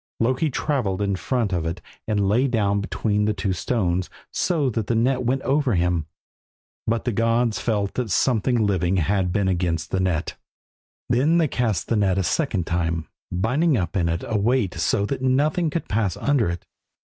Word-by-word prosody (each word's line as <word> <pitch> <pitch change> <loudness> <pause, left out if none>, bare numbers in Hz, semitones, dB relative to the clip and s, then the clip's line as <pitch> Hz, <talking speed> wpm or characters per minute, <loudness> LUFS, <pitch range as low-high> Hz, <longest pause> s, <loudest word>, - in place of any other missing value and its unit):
Loki 130 +7 +1
travelled 125 -9 -1
in 100 -1 0
front 115 0 -1
of 85 -2 0
it 85 +2 -3 0.3
and 105 -2 +1
lay 120 +7 +3
down 100 -5 +1
between 105 0 0
two 95 -1 -1
stones 90 -2 -1 0.2
so 160 -6 +1
that 110 -4 -2
the 120 - +1
net 125 +3 +2
went 130 +2 0
over 135 -4 +1
him, 85 -3 0 0.8
but 115 +1 0
the 120 - +1
gods 115 +1 +1
felt 105 -4 -1
that 125 -3 -2
something 120 +3 +2
living 95 -2 +1
had 95 +1 +1
been 100 0 +1
against 85 -3 -1
the 95 - 0
net. 90 -3 -1 0.7
Then 135 +8 +3
they 165 -2 +3
cast 120 -7 -1
the 115 - +1
net 95 -2 +2
a 95 - +1
second 105 - 0
time, 85 -1 -1 0.2
binding 130 - +1
up 90 -2 -2
in 85 -4 +1
it 85 0 -2
a 110 -3 0
weight 110 -3 +1
so 80 +5 +1
that 130 +4 -3
nothing 150 +6 +2
could 165 +2 -3
pass 105 -5 0
under 140 -9 +1
it. 85 0 -5
105 Hz, 185 wpm, -23 LUFS, 95-125 Hz, 0.8 s, lay